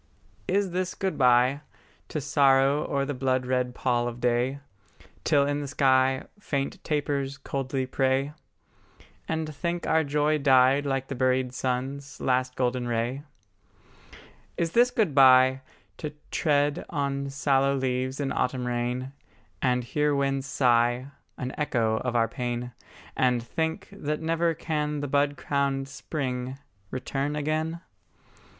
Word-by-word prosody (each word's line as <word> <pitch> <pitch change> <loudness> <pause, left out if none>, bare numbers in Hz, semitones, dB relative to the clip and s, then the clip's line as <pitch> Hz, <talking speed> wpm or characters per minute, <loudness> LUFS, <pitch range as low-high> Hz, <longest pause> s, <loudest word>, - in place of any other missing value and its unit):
Is 195 0 +1
this 185 +1 -2
good 190 -1 -2
bye, 125 +2 +4 0.5
To 155 - -3
sorrow 140 +1 +3
o'er 140 -1 +1
the 145 - -3
blood 130 -1 0
red 125 -1 -1
pall 120 -2 0
of 120 0 -6
day, 125 +3 +1 0.6
Till 145 -3 +3
in 145 +1 -1
the 145 - -4
sky 130 -1 +3 0.2
Faint 140 -8 -3
tapers 140 -2 -1
coldly 135 -1 -3
pray; 135 +2 0 0.9
And 160 -1 -2
think 170 +3 -3
our 160 0 +3
joy 150 +1 +1
died 135 +1 +4
like 135 -1 -1
the - - -4
buried 130 0 +1
sun's 135 +3 -3
Last 130 0 0
golden 125 -1 0
ray? 120 +3 -1 1.4
Is 165 -1 0
this 240 +4 +5
good 210 - 0
bye, 130 -1 +6 0.4
To 150 -1 -5 0.2
tread 145 -2 +1
on 140 -2 -2
sallow 135 0 +2
leaves 130 0 -1
in 140 -1 -1
autumn 125 0 -1
rain, 125 +2 -2 0.5
And 125 -1 +1
hear 150 +4 0
winds 135 -1 0
sigh 120 0 +2 0.3
An 130 0 -4
echo 115 -7 +1
of 125 +1 -3
our 115 -1 +3
pain; 120 0 -4 0.4
And 125 -2 +2
think 160 +6 -3
that 150 +1 -3
never 165 +1 0
can 150 -2 -2
the 145 - -2
bud 145 +1 +1
crowned 140 -1 -1
spring 130 -1 -4 0.3
Return 135 +4 -3
again? 155 +3 -2
135 Hz, 135 wpm, -27 LUFS, 125-145 Hz, 1.4 s, bye